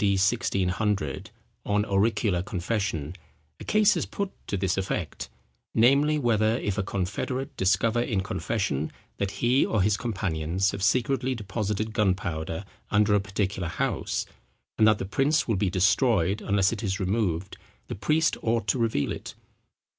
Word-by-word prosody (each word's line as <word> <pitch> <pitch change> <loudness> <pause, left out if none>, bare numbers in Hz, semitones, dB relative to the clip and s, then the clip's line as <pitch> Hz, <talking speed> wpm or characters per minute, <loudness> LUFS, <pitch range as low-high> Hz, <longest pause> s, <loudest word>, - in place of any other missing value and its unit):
D. 100 -1 +4
1600, 100 - 0 0.3
on 105 0 +1
auricular 100 -2 +1
confession, 90 -5 -2 0.4
a - - -8
case 215 -1 +4
is - - -2
put 200 -1 -3 0.2
to 100 - -1
this 95 -1 0
effect; 95 0 -3 0.5
namely, 140 +6 +4
whether 115 -4 +2
if 105 -5 -2
a - - +3
confederate 100 +7 -3
discover, 100 +5 +2
in 105 -5 0
confession, 95 -7 -2 0.3
that 100 - -1 0.2
he 125 +3 +4
or 105 -4 +1
his 105 +1 +2
companions 95 -4 -1
have 100 - -6
secretly 130 +5 +1
deposited 105 0 -3
gunpowder 90 -4 -1 0.2
under 105 0 +3
a 105 - +5
particular 100 -2 -2
house, 80 - -2 0.5
and 110 - +4
that 110 -1 +5
the 95 - -4
prince 135 +7 +1
will 115 - +1
be 95 0 +1
destroyed 95 +1 +2
unless 100 +1 +2
it 115 - -5
is 95 -3 -2
removed, 95 -2 -1 0.3
the - - -6
priest 155 +10 +1
ought 115 0 0
to 130 - +2
reveal 110 -12 0
it. - - -7
105 Hz, 150 wpm, -26 LUFS, 95-115 Hz, 0.5 s, a